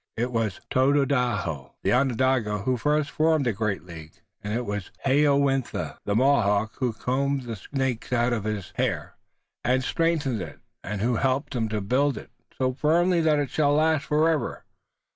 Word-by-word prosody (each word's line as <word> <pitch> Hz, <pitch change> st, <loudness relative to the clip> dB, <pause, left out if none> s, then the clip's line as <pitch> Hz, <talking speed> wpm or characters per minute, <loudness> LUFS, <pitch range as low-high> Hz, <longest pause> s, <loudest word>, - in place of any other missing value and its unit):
It 120 Hz, +2 st, -1 dB
was 115 Hz, -5 st, -1 dB
Tododaho, 125 Hz, -, +1 dB
the -, -, +2 dB
Onondaga, 125 Hz, -5 st, +1 dB
who 130 Hz, +2 st, +1 dB
first 150 Hz, +4 st, 0 dB
formed 155 Hz, -2 st, +2 dB
the 120 Hz, -, +1 dB
great 105 Hz, -1 st, -2 dB
League 80 Hz, -3 st, -11 dB, 0.3 s
and 105 Hz, -, -4 dB
it 120 Hz, +3 st, -1 dB
was 105 Hz, -3 st, -4 dB, 0.2 s
Hayowentha, 140 Hz, -1 st, +1 dB
the 100 Hz, -, 0 dB
Mohawk, 110 Hz, -5 st, +2 dB
who 125 Hz, -2 st, +1 dB
combed 135 Hz, +4 st, -1 dB
the 115 Hz, -2 st, -5 dB
snakes 130 Hz, +3 st, -3 dB
out 120 Hz, 0 st, +2 dB
of 110 Hz, -4 st, -2 dB
his 105 Hz, -4 st, -4 dB
hair -, -, -1 dB, 0.5 s
and 130 Hz, +2 st, +2 dB
who -, -, -3 dB
strengthened 155 Hz, -, 0 dB
it 80 Hz, -4 st, -8 dB, 0.2 s
and 100 Hz, 0 st, -4 dB
who 120 Hz, +1 st, +1 dB
helped 135 Hz, +3 st, 0 dB
him 115 Hz, -2 st, -1 dB
to 105 Hz, -1 st, -2 dB
build 130 Hz, +7 st, +1 dB
it -, -, -10 dB, 0.3 s
so 130 Hz, -1 st, 0 dB
firmly 170 Hz, +5 st, +2 dB
that 155 Hz, -2 st, +3 dB
it 145 Hz, -3 st, -1 dB
shall 145 Hz, -2 st, +2 dB
last 155 Hz, 0 st, +2 dB
forever. 155 Hz, +1 st, 0 dB
130 Hz, 170 wpm, -25 LUFS, 110-145 Hz, 0.5 s, that